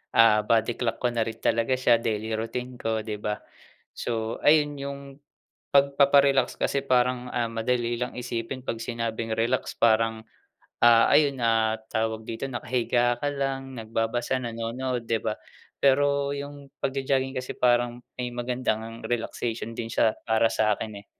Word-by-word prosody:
ah, 115 -2 +6
body 115 0 +2
clock 115 -2 -1
ko 120 - +2
na 115 -1 -1
rin 110 - -4
talaga 115 +3 +2
siya 120 -2 +3
daily 110 -1 -2
routine 125 +3 -4
ko, 110 -1 -1
'di 105 -2 -5
ba. 105 0 -2 0.6
So 115 -1 -2
ayun 145 -1 +4
yung 140 0 -5 0.7
pagpapa-relax 140 0 +4
kasi 140 - 0
parang, 125 -1 +1
ah, 120 -1 -1
madali 120 +1 -1
lang 125 0 -4
isipin 120 +2 -4
'pag 115 0 -3
sinabing 115 -1 -3
relax 115 +1 -1
parang, 110 -1 +2 0.6
ah, 115 -1 +7
ayun 140 -4 +4
na 110 -1 +2
tawag 110 0 -1
dito 115 +4 -4
nakahiga 120 -1 0
ka 145 - -1
lang, 135 -1 -3
nagbabasa, 115 +2 -1
nanonood 120 +1 -3
'di 115 -1 +2
ba. 110 -1 0 0.5
Pero 140 +1 +3
yung 140 0 -8
pag-jo-jogging 135 0 -1
kasi 125 0 -4
parang 120 -1 +2 0.2
may 125 - -2
maganda 125 +1 -1
ngang 115 +1 -9
relaxation 115 -1 -3
din 115 -1 -4
siya 110 -1 +3 0.2
para 110 0 +4
sa'kin 110 -2 -1
eh. - - -33
120 Hz, 150 wpm, -26 LUFS, 115-130 Hz, 0.7 s, ah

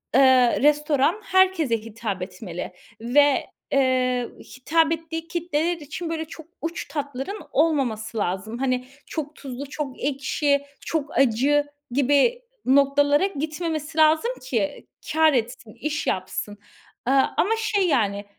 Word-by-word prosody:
ııı, 260 -3 +5
restoran 295 +6 +3
herkese 370 -10 +3
hitap 220 -3 -5
etmeli 180 -1 -6 0.3
ve, 280 +4 +3 0.2
eee, 255 -2 +2 0.3
hitap 320 +4 +2
ettiği 325 0 -4
kitleler 340 0 -1
için, 325 +2 -6
böyle, 320 -1 -3
çok 315 0 -11 0.2
uç 330 +1 -4
tatların 285 +7 -4
olmaması 250 -8 0
lazım. 205 +4 -2
Hani, 255 -1 0 0.2
çok 305 -1 -5
tuzlu, 270 0 -7
çok 290 -3 -5
ekşi, 280 +1 +1 0.2
çok 305 -3 -2
acı 275 +4 +3 0.3
gibi 285 - +3 0.2
noktalara 280 +4 +4
gitmemesi 315 -1 -4
lazım 315 +9 +4
ki 235 -6 -2 0.3
kâr 315 -1 +5
etsin, 235 -2 -2
iş 300 +5 -3
yapsın, 190 +2 -3 0.5
ııı, 270 0 +4
ama 400 - +3
şey, 410 -4 +1
yani, 205 -8 +1
280 Hz, 120 wpm, -24 LUFS, 250-320 Hz, 0.5 s, ııı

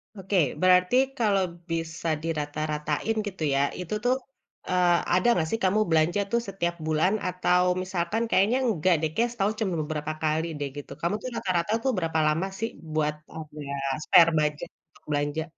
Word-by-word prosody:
Oke, 195 0 -2 0.2
berarti 180 +4 +4 0.2
kalo 205 -4 +2 0.3
bisa 165 0 -3 0.2
dirata-ratain, 155 +4 -2
gitu 185 -5 -5
ya, 135 - +2 0.2
itu 180 +3 -5
tuh, 250 +1 +3 0.5
eee, 180 -1 +4 0.2
ada 185 +6 +3
nggak 160 -2 0
sih 225 - 0
kamu 195 +3 +3
belanja 160 +4 +2
tuh 235 0 +2
setiap 175 -3 -2
bulan 160 +5 +2
atau 180 0 +2 0.2
misalkan 185 +4 -1
kayaknya 210 +7 +3
nggak 185 -2 +2
deh, 160 - 0
kayaknya 235 +4 +1
setahun 210 0 0
cuman 185 -5 0
beberapa 150 0 -3
kali 155 +1 +1
deh, 145 - -2
gitu. 145 - -8
Kamu 170 +4 0
tuh 255 - -4
rata-rata 185 0 -1
tuh 265 - +2
berapa 160 -2 0
lama 160 +5 +1
sih 225 +1 -1 0.2
buat, 150 -1 +1 0.2
apa 155 -1 -9
ya, - - -3 0.3
spare 170 -1 +7
budget 150 -1 -1 0.2
untuk - - -25
belanja? 145 +2 -1
170 Hz, 170 wpm, -26 LUFS, 155-195 Hz, 0.5 s, spare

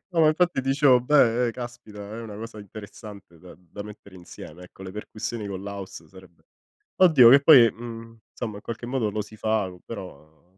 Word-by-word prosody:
No, 165 - +1
ma 155 - +6
infatti 170 -1 +1
dicevo: 135 -1 +3
"Beh, 125 -3 +3
ehm, - - -1
caspita 120 -3 -10
è 105 +3 -8
una 110 -3 -9
cosa 115 0 -9
interessante 100 -3 -12
da 90 +2 -14
da 90 +3 -10
mettere 100 -2 -13
insieme. 90 -1 -12
Ecco 90 +1 -14
le 95 - -7
percussioni 110 +1 -6
con 95 -1 -6
l'house 100 -5 -8
sarebbe" 95 -1 -18 0.6
oddio 140 -10 +7
che 140 +2 +7
poi, 130 -7 +7
mhmm, 115 0 -10
insomma, 110 -4 -6
in 105 - -11
qualche 115 +1 -7
modo 120 -4 -1
lo 105 +1 -3
si 110 +1 -14
fa 110 -3 -1
co 90 -1 -15
però 80 -8 -11
110 Hz, 195 wpm, -24 LUFS, 100-120 Hz, 0.6 s, oddio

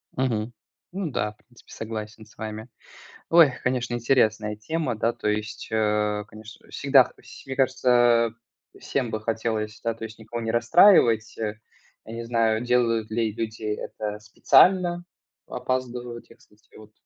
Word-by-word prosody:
Мгм. 120 -3 -1 0.4
Ну 180 -3 -4
да, 105 -4 -2
в - - -35
принципе, 120 +1 -21
согласен 110 0 -7
с - - -22
вами. 110 +1 -6 0.6
Ой, 165 -4 +7
конечно, 125 -1 -1
интересная 110 -3 +1
тема, 130 +4 -3
да, 115 +2 0
то - - -5
есть, 105 +1 -3
э. 105 -1 0
Конечно, 110 +1 -14
всегда 135 -2 +4
все - - -13
мне 135 - -3
кажется, 120 -3 +3 0.5
всем 130 -4 -2
бы 110 - -2
хотелось, 110 -1 -3
да, 115 - 0
то 115 - -10
есть, 110 0 -8
никого 110 +2 -6
не 115 0 -2
расстраивать. 115 - +5 0.7
Не 115 +1 -7
знаю, 115 -2 +1
делают 115 -3 +1
ли 110 -1 0
люди 110 0 -5
это 105 0 -4
специально, 175 - +3 0.4
опаздывают 125 -2 -4
те, 115 - -17
кстати, 105 +1 -26
вот. 105 0 -15
115 Hz, 145 wpm, -25 LUFS, 110-125 Hz, 0.7 s, Ой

